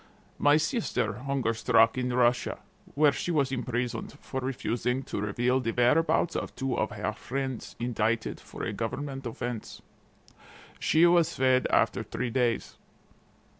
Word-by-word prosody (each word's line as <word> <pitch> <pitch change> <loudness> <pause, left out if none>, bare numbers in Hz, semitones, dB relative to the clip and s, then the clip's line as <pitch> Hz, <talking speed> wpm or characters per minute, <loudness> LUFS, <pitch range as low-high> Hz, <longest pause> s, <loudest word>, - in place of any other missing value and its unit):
My 145 +1 +5
sister 230 - -1
hunger 130 -3 -1
struck 115 0 +4
in 125 -1 -1
Russia, 120 0 +2 0.4
where 150 0 +5
she 175 - -4
was 140 -5 +1
imprisoned 120 -2 -3
for 130 - -5
refusing 125 0 -1
to 100 - -4
reveal 120 +5 +1
the 115 -3 -1
whereabouts 160 +7 +3
of - - -4
two 135 -2 -2
of 110 - 0
her 105 +1 -3
friends 130 +2 -5
indicted 115 -1 -1
for - - -9
a - - -2
government 135 -2 -4
offense. 120 -1 -6 1.0
She 160 +2 +4
was 170 -1 +4
fed 130 -1 +3
after - - +2
three 125 -2 -4
days. 120 -2 -1
125 Hz, 140 wpm, -28 LUFS, 120-140 Hz, 1.0 s, My